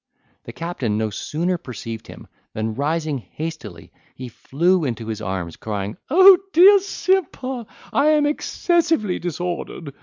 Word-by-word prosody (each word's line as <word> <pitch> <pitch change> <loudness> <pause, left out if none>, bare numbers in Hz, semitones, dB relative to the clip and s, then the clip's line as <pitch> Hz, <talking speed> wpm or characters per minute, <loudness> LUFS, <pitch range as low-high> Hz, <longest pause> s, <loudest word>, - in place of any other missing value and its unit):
The - - -7
captain 135 -11 -3
no 110 -1 -1
sooner 170 - -2
perceived 115 -4 -8
him, - - -11 0.3
than, 110 0 -2
rising 155 +2 -1
hastily, 120 - -8 0.2
he 130 -1 -8
flew 170 +9 0
into 115 -5 -3
his 110 -1 -5
arms, 90 -4 -4
crying, 105 -1 -4
"O, 355 +7 +5
my 375 - +6 0.2
dear 390 +5 +8
Simper, 295 - -2 0.3
I 280 - +3
am 305 -1 +4
excessively 305 - 0
disordered! 175 -3 -5
160 Hz, 140 wpm, -21 LUFS, -, 0.3 s, dear